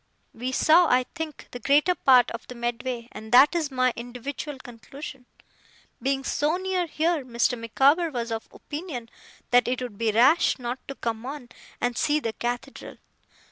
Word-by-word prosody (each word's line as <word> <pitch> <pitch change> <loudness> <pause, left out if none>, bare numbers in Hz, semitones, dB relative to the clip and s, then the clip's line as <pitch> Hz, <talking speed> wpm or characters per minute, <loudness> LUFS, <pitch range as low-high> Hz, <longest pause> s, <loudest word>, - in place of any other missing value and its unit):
We 250 +3 -4
saw, 325 +6 +5
I 255 -2 +3
think, 320 -3 -7
the 245 - -7
greater 290 +8 +3
part 255 -7 +5
of 230 - -7
the 250 - -9
Medway; 240 0 -3
and 220 +1 -10
that 260 +6 +7
is 325 -4 -1
my 255 -2 +1
individual 250 +4 -6
conclusion. 255 +2 -10 0.7
Being 270 0 0
so 300 +5 0
near 370 -2 -1
here, 320 -1 0
Mr. 245 0 0
Micawber 275 +9 +2
was 240 -5 -4
of 225 0 -5
opinion 290 -7 -7 0.4
that 245 0 +5
it 250 0 0
would 245 -5 -7
be 225 -1 +2
rash 260 +10 +4
not 245 0 -4
to 275 - -6
come 225 -2 -3
on, 265 -1 -7 0.3
and 245 0 -1
see 300 +3 +2
the 225 -6 -3
Cathedral. 245 +4 -5
255 Hz, 170 wpm, -25 LUFS, 240-295 Hz, 0.7 s, that